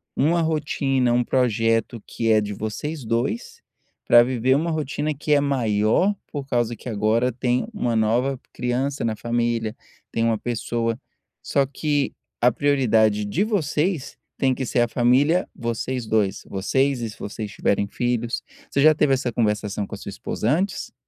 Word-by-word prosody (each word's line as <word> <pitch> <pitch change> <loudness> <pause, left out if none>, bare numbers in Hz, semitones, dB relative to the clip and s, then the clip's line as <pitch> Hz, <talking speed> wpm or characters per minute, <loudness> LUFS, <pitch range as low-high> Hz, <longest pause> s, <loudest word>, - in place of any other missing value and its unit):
uma 165 +4 +2
rotina, 140 -5 +1
um 120 0 +3
projeto 115 -2 +1
que 115 -1 -2
é 110 - +5
de 105 0 -4
vocês 130 +9 -4
2, 115 +1 -2 0.5
para 120 0 +8
viver 130 +1 +1
uma 160 +4 0
rotina 150 0 -2
que 150 +2 0
é 145 - +4
maior, 125 - +2 0.2
por 140 -2 -5
causa 120 -3 0
que 125 - -12
agora 115 +3 +1
tem 125 +1 0
uma 120 - -1
nova 120 +5 +1
criança 130 +3 -1
na 110 -1 0
família, 115 -1 -1 0.4
tem 115 - 0
uma 115 -1 +2
pessoa, 115 0 -2 0.4
só 140 -1 +2
que 145 +1 -1 0.3
a 125 +1 +5
prioridade 110 -6 +2
de 155 - 0
vocês 160 - -1 0.2
tem 135 -1 +2
que 130 - -3
ser 120 0 +1
a 120 - +3
família, 135 +10 +3
vocês 120 +1 -3
2, 110 -3 0
vocês 130 +7 +1
e 115 - -3
se - - -14
vocês 105 +1 -5
tiverem 100 0 0
filhos. 120 +1 -2 0.3
Você 140 - +1
já 155 +1 +7
teve 150 -2 +3
essa 130 -2 0
conversação 105 -3 -1
com - - -6
a - - -9
sua 100 - -8
esposa 105 +2 -3
antes? 190 +6 -1
120 Hz, 165 wpm, -23 LUFS, 115-140 Hz, 0.5 s, para